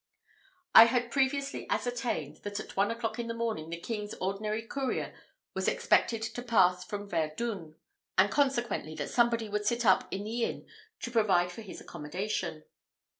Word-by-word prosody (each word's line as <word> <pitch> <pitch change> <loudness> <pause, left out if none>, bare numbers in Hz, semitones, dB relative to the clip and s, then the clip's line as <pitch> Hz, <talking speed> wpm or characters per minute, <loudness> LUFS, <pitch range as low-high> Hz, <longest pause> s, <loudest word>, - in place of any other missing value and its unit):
I 225 - +12
had 240 0 0
previously 275 +1 0
ascertained, 245 -1 -2
that 205 0 -5
at - - -8
one 200 +1 +3
o'clock 230 -1 -3
in 235 - -2
the 230 - -3
morning 225 -9 -2
the 170 0 -5
king's 210 +1 -4
ordinary 210 +4 -2
courier 265 +2 -2 0.4
was - - -1
expected 225 -1 +2
to 225 +2 -4
pass 185 -7 +3
from 205 0 -6
Verdun; 165 0 -2 0.4
and, - - +5
consequently, 240 - 0
that - - -4
somebody 235 -2 +2
would 210 0 -2
sit 235 +1 +1
up 190 -2 +5
in 195 - -3
the 230 +3 -2
inn - - -3 0.4
to 240 - -4
provide 190 -6 +3
for 200 - -8
his 200 -4 -9
accommodation. 170 0 -4
220 Hz, 165 wpm, -30 LUFS, 190-235 Hz, 0.4 s, I